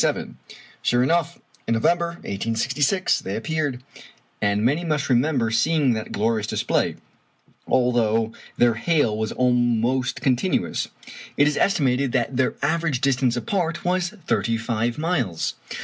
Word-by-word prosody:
Sure 120 Hz, +1 st, +2 dB
enough, 170 Hz, +4 st, 0 dB, 0.3 s
in 115 Hz, -, +2 dB
November, 170 Hz, +9 st, +2 dB, 0.2 s
1866, 125 Hz, -, 0 dB
they 95 Hz, -, -4 dB
appeared; 145 Hz, -1 st, -2 dB, 0.6 s
and 105 Hz, +1 st, +1 dB
many 145 Hz, +7 st, +2 dB
must 150 Hz, -4 st, -1 dB
remember 125 Hz, -2 st, +2 dB
seeing 135 Hz, +3 st, +2 dB
that 110 Hz, -1 st, -5 dB
glorious 110 Hz, 0 st, 0 dB
display. -, -, 0 dB, 0.7 s
Although 115 Hz, -3 st, +2 dB, 0.3 s
their 120 Hz, -1 st, +4 dB
hail 115 Hz, -1 st, +1 dB
was 110 Hz, 0 st, -2 dB
almost 125 Hz, 0 st, +1 dB
continuous, 135 Hz, +8 st, 0 dB, 0.5 s
it 145 Hz, -, +5 dB
is 150 Hz, -, +1 dB
estimated 135 Hz, -8 st, +1 dB
that 125 Hz, 0 st, 0 dB
their 130 Hz, 0 st, +1 dB
average 155 Hz, -3 st, 0 dB
distance 130 Hz, -2 st, +1 dB
apart 170 Hz, -, -2 dB
was 180 Hz, -1 st, +1 dB, 0.2 s
thirty 115 Hz, -1 st, +1 dB
five 115 Hz, +1 st, -2 dB
miles! 145 Hz, -, -1 dB
125 Hz, 125 wpm, -23 LUFS, 115-155 Hz, 0.7 s, it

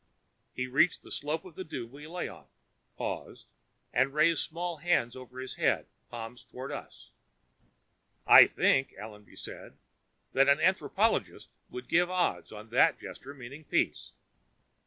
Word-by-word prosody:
He 125 Hz, -, -1 dB
reached 135 Hz, +7 st, +2 dB
the -, -, -13 dB
slope 150 Hz, +4 st, -3 dB
of 185 Hz, -, -11 dB
the 185 Hz, -, -6 dB
dune 120 Hz, -8 st, -7 dB
we 145 Hz, +3 st, -11 dB
lay 175 Hz, +2 st, -4 dB
on, -, -, -12 dB, 0.5 s
paused -, -, -5 dB, 0.5 s
and 135 Hz, +3 st, +2 dB
raised 155 Hz, +1 st, +4 dB
small 170 Hz, +1 st, -4 dB
hands 150 Hz, -7 st, +1 dB
over 130 Hz, 0 st, -10 dB
his 130 Hz, 0 st, -5 dB
head, -, -, +2 dB, 0.2 s
palms 120 Hz, +1 st, -8 dB
toward 130 Hz, +2 st, -8 dB
us. -, -, -9 dB, 1.1 s
"I -, -, +10 dB
think," 135 Hz, 0 st, +2 dB
Allenby 105 Hz, -1 st, -11 dB
said, -, -, -10 dB, 0.6 s
"that 135 Hz, +1 st, +5 dB
an 140 Hz, +2 st, +5 dB
anthropologist 190 Hz, +5 st, +1 dB, 0.2 s
would 125 Hz, 0 st, -8 dB
give 175 Hz, +1 st, +3 dB
odds 185 Hz, -1 st, -1 dB
on 110 Hz, +1 st, -10 dB
that 125 Hz, -, +4 dB
gesture 140 Hz, +2 st, -9 dB
meaning 135 Hz, +4 st, -10 dB
peace." -, -, -1 dB
140 Hz, 145 wpm, -30 LUFS, 125-165 Hz, 1.1 s, I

